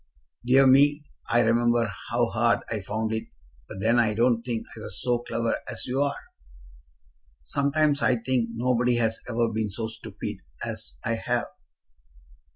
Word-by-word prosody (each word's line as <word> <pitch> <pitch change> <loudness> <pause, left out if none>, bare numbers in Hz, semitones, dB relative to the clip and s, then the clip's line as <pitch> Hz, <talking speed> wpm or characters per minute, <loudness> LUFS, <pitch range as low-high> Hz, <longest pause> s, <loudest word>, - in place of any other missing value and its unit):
Dear 130 +3 +5
me! 145 +3 +5 0.3
I 120 - +4
remember 120 -1 +2 0.2
how 120 +2 +2
hard 115 0 +1
I 110 - -1
found 110 +3 -2
it, 110 - -2 0.4
but - - -8
then 115 +3 +3
I 110 -3 +2
don't 120 0 +3
think 115 -2 -3
I - - -9
was 105 -2 -7
so 120 -1 +1
clever 115 -1 -2
as - - -3
you 130 +2 -1
are." 140 -1 0 1.3
"Sometimes 140 - +1
I 125 - +3
think 120 0 0
nobody 125 +1 +1
has 115 -1 0
ever 115 -1 +1
been 110 -1 -1
so 110 +3 -4
stupid - - -7 0.3
as - - -6
I - - 0
have." - - 0
120 Hz, 160 wpm, -26 LUFS, 115-125 Hz, 1.3 s, Dear